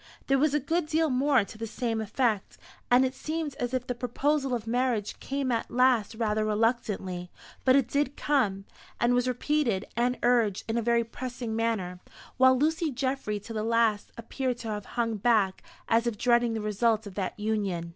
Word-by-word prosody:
There 270 0 +2
was 295 0 +2
a - - +3
good 320 +4 -1
deal 315 -1 +1
more 260 -1 +3
to 215 +2 -12
the 225 - -3
same 225 -1 -2
effect, 220 -1 -1 0.3
and 250 +2 +5
it 260 - -2
seemed 310 0 -4
as 245 -1 -1
if 255 -1 -2
the 250 - -2
proposal 265 +3 0
of 230 -2 -5
marriage 235 -3 -1
came 275 -1 -2
at 230 -1 -1
last 245 -3 +2
rather 215 -1 0
reluctantly; 210 -5 -1 0.4
but 260 0 +6
it 275 -4 +3
did 285 0 -1
come, 205 -10 0 0.3
and 240 +1 +3
was 245 0 +2
repeated, 250 -5 0
and 245 +2 +1
urged 235 -5 +2
in 225 - -1
a 235 - +1
very 235 +1 +2
pressing 240 -1 -5
manner; 215 -6 -1 0.4
while 260 0 +6
Lucy 320 +3 +1
Geoffry 260 -5 -2
to 225 +3 -8
the 215 - -2
last 225 -2 +1
appeared 250 +2 -3
to 230 -2 -6
have 210 -2 -4
hung 230 -2 0
back, 205 -3 +2 0.3
as 230 +1 +2
if 230 -3 -2
dreading 240 0 +3
the 220 - -2
result 215 +1 +1
of 200 - -8
that 190 +1 -4
union. 200 -6 -1
235 Hz, 190 wpm, -28 LUFS, 215-260 Hz, 0.4 s, but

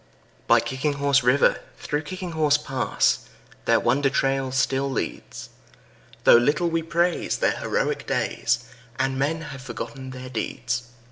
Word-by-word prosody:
By - - +6
Kicking 140 +3 -2
Horse 140 -1 +2
River, 125 +3 +3 0.2
through 150 0 -2
Kicking 180 +3 -6
Horse 155 -2 +3
Pass, 135 -3 0 0.5
Their - - +4
wonder 135 +3 +2
trail 135 -1 0
still 135 +1 +1
leads, 130 - -5 0.7
Though - - +8
little 150 +8 +2
we 165 0 +1
praise 170 +2 0
their - - +2
heroic - - -1
days - - 0 0.3
And 130 0 0
men 160 +4 0
have 145 -4 -8
forgotten 130 +1 -7
their 130 0 -8
deeds. 120 0 -3
140 Hz, 140 wpm, -24 LUFS, 130-150 Hz, 0.7 s, Though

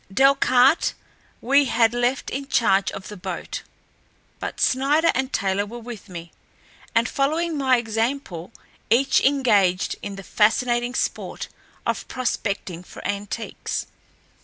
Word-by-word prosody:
Delcarte 265 - +4 0.5
we 275 +3 +4
had 230 -2 +3
left 245 +2 0
in 275 +1 -4
charge 195 -7 +3
of 190 - -8
the 210 - -8
boat; 180 - -5 0.8
but - - -5
Snider 290 +5 +3
and 265 0 -1
Taylor 195 0 0
were 220 +4 -8
with 235 -4 -9
me, 170 -1 -8 0.6
and 230 +2 +4
following 315 +4 0
my 265 -3 +3
example, 225 -5 -2 0.4
each 260 +5 +4
engaged 210 -10 +3
in 200 -1 -5
the 195 - -9
fascinating 240 +4 +1
sport - - -3 0.4
of - - -2
prospecting 200 -8 -2
for - - -12
antiques. 205 +3 -4
240 Hz, 125 wpm, -23 LUFS, 200-270 Hz, 0.8 s, Delcarte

